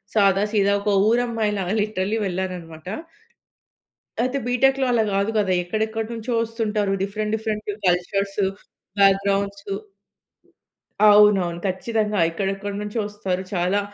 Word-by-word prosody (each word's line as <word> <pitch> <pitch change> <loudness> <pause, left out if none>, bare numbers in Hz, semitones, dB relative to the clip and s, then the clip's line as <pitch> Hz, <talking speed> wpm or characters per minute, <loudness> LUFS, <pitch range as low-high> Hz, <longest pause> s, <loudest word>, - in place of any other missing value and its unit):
సాదా 200 -2 +4
సీదా 200 -2 +3
ఒక 210 - -1 0.2
ఊరమ్మాయిలాగా 220 -5 0
లిట్‌రల్లి 210 0 -1
వెళ్ళానన్నమాట. 180 -3 -5 1.3
అయితే 255 +3 0
బీటెక్‌లో 265 +2 +3
అలా 235 -2 +3
కాదు 200 +2 +1
కదా! 200 -3 +1
ఎక్కడెక్కడి 220 +4 -2
నుంచో 230 +2 -4
వస్తుంటారు. 220 -3 -1
డిఫరెంట్ 210 +2 -3
డిఫరెంట్ 215 -1 -4 0.2
కల్చర్సు, 195 +3 0 0.5
బ్యాక్‌గ్రౌండ్సు 200 0 +2 1.4
అవునవును. 205 -5 +5
ఖచ్చితంగా 210 +2 -1
ఎక్కడెక్కడి 195 +3 -3
నుంచో 210 +2 -3
ఒస్తారు. 190 -3 -3
చాలా 180 +2 +1
205 Hz, 105 wpm, -23 LUFS, 195-220 Hz, 1.4 s, అవునవును